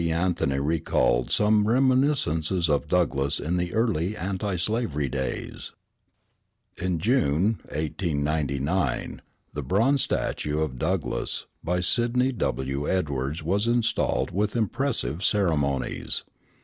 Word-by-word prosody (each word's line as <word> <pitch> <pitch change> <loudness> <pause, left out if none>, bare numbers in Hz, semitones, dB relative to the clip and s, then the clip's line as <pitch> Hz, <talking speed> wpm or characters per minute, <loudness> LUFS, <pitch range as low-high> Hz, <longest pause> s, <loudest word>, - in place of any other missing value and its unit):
Anthony 80 -5 0
recalled 70 -5 +1
some 105 0 +3
reminiscences 120 - +2
of 70 - +1
Douglass 70 0 +1
in 85 +4 -1
the 90 0 -1
early 110 -4 0
anti 95 0 -2
slavery 85 - -1
days. 65 -2 -4 1.0
In 90 -1 -1
June, 100 - +2
1899, 75 -1 -1 0.3
the - - -3
bronze 120 +9 +2
statue 75 +1 -1
of 65 -5 -2
Douglass, - - -1 0.2
by 90 +2 0
Sidney 120 +7 +2
W. 70 - -2
Edwards, 75 -3 -1
was 100 +7 +1
installed 120 -1 +1
with 105 +5 -1
impressive 115 - -1
ceremonies. 75 -9 0
90 Hz, 105 wpm, -26 LUFS, 75-110 Hz, 1.0 s, some